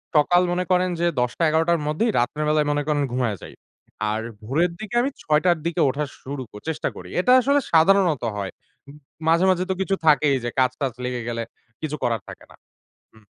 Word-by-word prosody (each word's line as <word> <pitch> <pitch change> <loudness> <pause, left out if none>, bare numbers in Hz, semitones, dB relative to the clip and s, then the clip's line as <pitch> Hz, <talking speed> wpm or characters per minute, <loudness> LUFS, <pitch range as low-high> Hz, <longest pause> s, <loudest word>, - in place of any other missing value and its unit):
সকাল 175 +4 +5
মনে 180 +1 0
করেন 180 0 +3
যে 175 - +1
১০ 125 +7 -1
১১ 160 +1 +2
টার 170 - +3
মধ্যেই 220 +10 +1
রাত্রের 150 +5 -1
বেলায় 150 -1 +2
মনে 145 0 0
করেন 145 -1 +1
ঘুমাইয়া 120 -5 -1
যাই। - - -10 0.6
আর 110 +1 -2 0.2
ভোরের 160 +10 +1
দিকে 220 +2 -6
আমি 270 - 0
৬ 150 0 +2
টার 175 -2 +4
দিকে 170 0 0
উঠা 145 +3 -2 0.2
শুরু 140 0 -6
ক - - -58
চেষ্টা 160 - -2
করি। - - -10
এটা 250 +7 +3
আসলে 280 +3 +3
সাধারণত 165 -3 +4
হয়। 100 -2 -4 0.4
ম - - -10 0.4
মাঝে, 170 +3 +4
মাঝে, 185 0 +2
তো - - +2
কিছু 195 0 0
থাকেই 150 -2 +4
যে 120 - -1
কাজ-টাজ 130 0 0
লেগে 125 -1 -3
গেলে 115 -1 -2 0.4
কিছু 155 -1 -3
করার 115 -3 0
থাকে - - -11
না। - - -15 0.6
হুম। 110 -1 -21
150 Hz, 200 wpm, -23 LUFS, 130-175 Hz, 0.6 s, সকাল